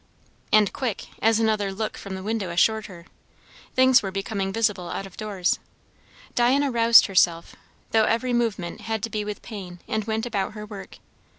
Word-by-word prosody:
And 215 Hz, -1 st, +4 dB
quick, 240 Hz, -7 st, -3 dB
as 225 Hz, 0 st, +3 dB
another 215 Hz, -3 st, +1 dB
look 215 Hz, +2 st, -4 dB
from 195 Hz, -1 st, -7 dB
the 190 Hz, -, -7 dB
window 210 Hz, -3 st, -2 dB
assured 215 Hz, +5 st, +2 dB
her. 170 Hz, -3 st, -12 dB, 0.7 s
Things 260 Hz, -1 st, +6 dB
were 195 Hz, -, -3 dB
becoming 195 Hz, 0 st, -3 dB
visible 205 Hz, -5 st, 0 dB
out 195 Hz, -, -4 dB
of 195 Hz, -, -12 dB
doors. 200 Hz, -4 st, -1 dB, 0.7 s
Diana 265 Hz, +3 st, +2 dB
roused 230 Hz, -1 st, +7 dB
herself, 175 Hz, -3 st, +1 dB, 0.4 s
though 220 Hz, -1 st, +4 dB
every 245 Hz, +3 st, 0 dB
movement 220 Hz, -8 st, -1 dB
had 220 Hz, -2 st, -3 dB
to 230 Hz, -, -3 dB
be 210 Hz, -1 st, -2 dB
with 210 Hz, 0 st, -6 dB
pain, 185 Hz, -6 st, -8 dB
and 215 Hz, -1 st, -2 dB
went 220 Hz, +1 st, -2 dB
about 210 Hz, -4 st, -2 dB
her 210 Hz, -1 st, -7 dB
work. 205 Hz, -2 st, -10 dB
215 Hz, 175 wpm, -24 LUFS, 195-225 Hz, 0.7 s, roused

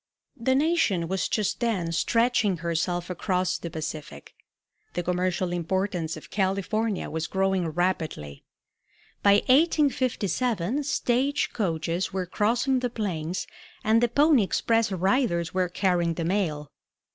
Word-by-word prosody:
The 260 Hz, 0 st, +1 dB
nation 275 Hz, -, +2 dB
was 190 Hz, 0 st, -1 dB
just 215 Hz, -3 st, -1 dB
then 200 Hz, -9 st, -1 dB
stretching 230 Hz, +2 st, +2 dB
herself 175 Hz, +1 st, -2 dB
across 180 Hz, 0 st, 0 dB
to -, -, -21 dB
the 170 Hz, -, -4 dB
Pacific. 155 Hz, -, -7 dB, 0.6 s
The 175 Hz, -, -2 dB
commercial 180 Hz, 0 st, -1 dB
importance 175 Hz, -1 st, -2 dB
of 155 Hz, -, -13 dB
California 200 Hz, +2 st, -1 dB
was 160 Hz, +1 st, -3 dB
growing 190 Hz, -2 st, 0 dB
rapidly. 160 Hz, -, -2 dB, 0.8 s
By 200 Hz, 0 st, +5 dB
1857 255 Hz, -, +1 dB
stage 270 Hz, +1 st, 0 dB
coaches 170 Hz, -3 st, -1 dB
were 190 Hz, -1 st, -2 dB
crossing 235 Hz, +8 st, +1 dB
the 250 Hz, -1 st, -1 dB
plains 185 Hz, -7 st, -3 dB, 0.4 s
and 220 Hz, +2 st, +3 dB
the 240 Hz, -, +3 dB
pony 285 Hz, +1 st, +4 dB
express 225 Hz, +2 st, +1 dB
riders 190 Hz, -2 st, +1 dB
were 185 Hz, -1 st, +1 dB
carrying 175 Hz, -2 st, +1 dB
the 165 Hz, -, -3 dB
mail. 160 Hz, -6 st, -1 dB
190 Hz, 125 wpm, -26 LUFS, 170-230 Hz, 0.8 s, By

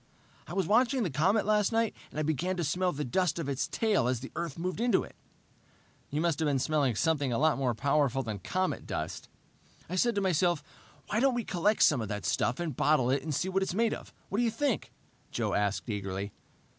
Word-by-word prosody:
"I -, -, -7 dB
was 190 Hz, -1 st, +1 dB
watching 245 Hz, -, +3 dB
the 175 Hz, -, -1 dB
comet 185 Hz, +10 st, +2 dB
last 210 Hz, 0 st, +2 dB
night, 225 Hz, -1 st, +1 dB
and -, -, -6 dB
I -, -, +1 dB
began 165 Hz, +5 st, -1 dB
to 175 Hz, -, 0 dB
smell 180 Hz, +4 st, +1 dB
the 150 Hz, -1 st, -3 dB
dust 175 Hz, +8 st, +1 dB
of 165 Hz, -4 st, -3 dB
its 140 Hz, -1 st, -1 dB
tail 215 Hz, -, +1 dB
as 125 Hz, -2 st, 0 dB
the 135 Hz, -, -8 dB
Earth 170 Hz, -2 st, -4 dB
moved 185 Hz, +5 st, -3 dB
into 240 Hz, 0 st, +3 dB
it...." -, -, -12 dB, 0.9 s
"You 150 Hz, -, -1 dB
must 170 Hz, -3 st, +1 dB
have 160 Hz, -, +1 dB
been 140 Hz, -2 st, +2 dB
smelling 140 Hz, -3 st, +1 dB
something 145 Hz, 0 st, +1 dB
a 115 Hz, -, +1 dB
lot 155 Hz, +1 st, +3 dB
more 125 Hz, -4 st, +1 dB
powerful 140 Hz, 0 st, +1 dB
than 110 Hz, -4 st, -4 dB
comet 185 Hz, -, -2 dB
dust." -, -, -4 dB, 0.6 s
"I 185 Hz, -, -4 dB
said 235 Hz, +5 st, +2 dB
to -, -, +2 dB
myself 175 Hz, -4 st, +2 dB, 0.5 s
why 215 Hz, -, +1 dB
don't 265 Hz, 0 st, +3 dB
we 240 Hz, -, -1 dB
collect 200 Hz, +3 st, +2 dB
some 140 Hz, -6 st, +4 dB
of 110 Hz, -, -3 dB
that 105 Hz, -1 st, -4 dB
stuff 125 Hz, -, 0 dB
and 165 Hz, -6 st, -3 dB
bottle 130 Hz, -4 st, +3 dB
it 135 Hz, 0 st, +1 dB
and 155 Hz, +3 st, -4 dB
see 165 Hz, +6 st, 0 dB
what 190 Hz, +1 st, 0 dB
it's 190 Hz, -1 st, -1 dB
made 225 Hz, +1 st, +2 dB
of? -, -, -8 dB, 0.2 s
What 200 Hz, -, -1 dB
do -, -, +3 dB
you 235 Hz, -, +3 dB
think?" 250 Hz, +2 st, -1 dB, 0.4 s
Joe -, -, -1 dB
asked 100 Hz, -1 st, 0 dB
eagerly. 100 Hz, -2 st, -4 dB
160 Hz, 230 wpm, -30 LUFS, 135-195 Hz, 0.9 s, some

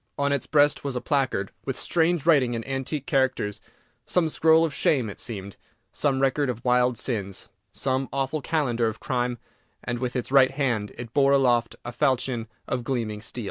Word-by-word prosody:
On 140 Hz, 0 st, +1 dB
its 140 Hz, -2 st, -1 dB
breast 145 Hz, -1 st, +3 dB
was 140 Hz, -2 st, -3 dB
a -, -, 0 dB
placard 130 Hz, -9 st, 0 dB
with 135 Hz, -, -4 dB
strange 170 Hz, -2 st, +1 dB
writing 135 Hz, -8 st, +4 dB
in 115 Hz, -, -4 dB
antique 135 Hz, +1 st, -3 dB
characters, 130 Hz, -9 st, 0 dB, 0.4 s
some 170 Hz, -3 st, +1 dB
scroll 160 Hz, +1 st, +4 dB
of 155 Hz, -, -4 dB
shame 125 Hz, -6 st, +1 dB
it -, -, -12 dB
seemed, 100 Hz, -4 st, -6 dB, 0.3 s
some 140 Hz, -3 st, 0 dB
record 135 Hz, +1 st, +1 dB
of 120 Hz, 0 st, -5 dB
wild 125 Hz, -1 st, +3 dB
sins, 100 Hz, -6 st, -3 dB, 0.2 s
some 130 Hz, 0 st, -1 dB
awful 135 Hz, +2 st, -1 dB
calendar 130 Hz, -7 st, 0 dB
of 110 Hz, -, -4 dB
crime, 125 Hz, -1 st, -1 dB, 0.5 s
and, 120 Hz, -1 st, -3 dB
with 125 Hz, 0 st, -3 dB
its 125 Hz, 0 st, -3 dB
right 135 Hz, -2 st, +6 dB
hand, 120 Hz, -8 st, -1 dB
it 120 Hz, -2 st, -8 dB
bore 140 Hz, -1 st, +4 dB
aloft 120 Hz, -4 st, +2 dB
a 120 Hz, -, -4 dB
falchion 125 Hz, -3 st, 0 dB, 0.2 s
of 125 Hz, -, -2 dB
gleaming 115 Hz, -5 st, -2 dB
steel. 110 Hz, -, -7 dB
130 Hz, 180 wpm, -25 LUFS, 120-140 Hz, 0.5 s, right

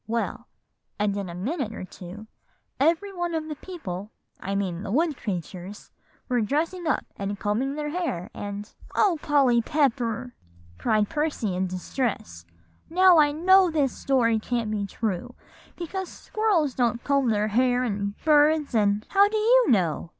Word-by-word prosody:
Well, 230 Hz, +1 st, -3 dB, 0.5 s
and 205 Hz, -1 st, 0 dB
in 200 Hz, -3 st, -4 dB
a 170 Hz, -, -7 dB
minute 235 Hz, -, -3 dB
or 185 Hz, -, -6 dB
two 185 Hz, +4 st, -10 dB, 0.5 s
every 335 Hz, +7 st, +2 dB
one 350 Hz, -2 st, -2 dB
of 315 Hz, -1 st, -3 dB
the 305 Hz, -, -4 dB
people, 210 Hz, -, -7 dB, 0.3 s
I 195 Hz, +1 st, -3 dB
mean 185 Hz, -3 st, -2 dB
the 205 Hz, -, -6 dB
wood 310 Hz, +5 st, +1 dB
creatures, 190 Hz, -1 st, -6 dB, 0.4 s
were 245 Hz, -2 st, +1 dB
dressing 325 Hz, -, -1 dB
up -, -, 0 dB
and 200 Hz, 0 st, -4 dB
combing 235 Hz, +7 st, -1 dB
their 295 Hz, 0 st, -3 dB
hair, 235 Hz, -, -3 dB
and" 205 Hz, 0 st, -6 dB, 0.3 s
"O 370 Hz, -7 st, +3 dB
Polly 270 Hz, -5 st, +3 dB
Pepper!" 250 Hz, -3 st, 0 dB, 0.4 s
exclaimed 215 Hz, -, +1 dB
Percy 295 Hz, -, -1 dB
in 185 Hz, +1 st, 0 dB
distress, 180 Hz, -, -4 dB, 0.4 s
"now 365 Hz, -1 st, +6 dB
I 295 Hz, -1 st, +5 dB
know 370 Hz, +4 st, +5 dB
this 290 Hz, -5 st, +1 dB
story 235 Hz, -5 st, +2 dB
can't 230 Hz, -1 st, -2 dB
be 205 Hz, -2 st, -2 dB
true; 220 Hz, +3 st, -3 dB, 0.4 s
because 370 Hz, +2 st, -5 dB
squirrels 385 Hz, -, 0 dB
don't 235 Hz, -2 st, 0 dB
comb 275 Hz, -3 st, +2 dB
their 210 Hz, -1 st, +1 dB
hair, 250 Hz, +3 st, +2 dB
and 200 Hz, -3 st, -2 dB
birds, 300 Hz, -1 st, +4 dB
and" 210 Hz, -1 st, +2 dB
"How 400 Hz, +1 st, +5 dB
do 435 Hz, -, -1 dB
you 475 Hz, +3 st, +4 dB
know?" 175 Hz, -7 st, +1 dB
245 Hz, 155 wpm, -25 LUFS, 205-315 Hz, 0.5 s, now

